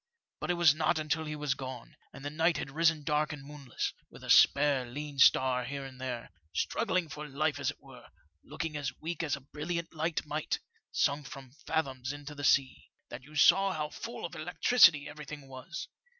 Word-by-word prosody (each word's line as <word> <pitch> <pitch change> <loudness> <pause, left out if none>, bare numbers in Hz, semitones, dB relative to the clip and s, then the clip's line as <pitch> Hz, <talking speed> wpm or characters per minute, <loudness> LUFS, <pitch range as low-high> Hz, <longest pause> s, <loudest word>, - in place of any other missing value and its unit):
But - - -4
it 175 - +2
was 170 -4 +6
not 160 +2 +1
until 155 +1 -1
he 150 0 -4
was 150 -2 0
gone, 130 -3 -8 0.2
and 140 +1 -11
the 145 - -3
night 160 +2 +2
had 135 - -5
risen 160 0 +2
dark 150 0 +1
and 145 -2 -7
moonless, 140 -3 -4 0.2
with - - -14
a - - 0
spare 140 -2 +6
lean 145 +2 -6
star 130 -1 +5
here 140 +3 -5
and 130 -1 -11
there, 125 -3 -5 0.2
struggling 185 - 0
for 150 0 -7
life 145 +1 -1
as 140 -1 0
it 145 - -6
were, 135 -3 -14 0.4
looking 160 -2 -5
as 140 -4 -4
weak 165 +3 -4
as 155 -4 0
a 140 - -11
brilliant 165 +5 -4
light 160 0 -1
might, 150 +1 -2 0.3
sunk 140 -1 +1
some 135 -1 -10 0.2
fathoms 130 -4 -1
into 145 0 -8
the 145 -1 -8
sea, 135 -2 +2 0.2
that 120 - -7
you 150 +4 -15
saw 195 +6 +5
how 150 -2 -3
full 230 +4 -6
of 170 - -6
electricity 170 -1 +4
everything 150 -1 -9
was. 135 +6 -7
150 Hz, 195 wpm, -31 LUFS, 135-160 Hz, 0.4 s, was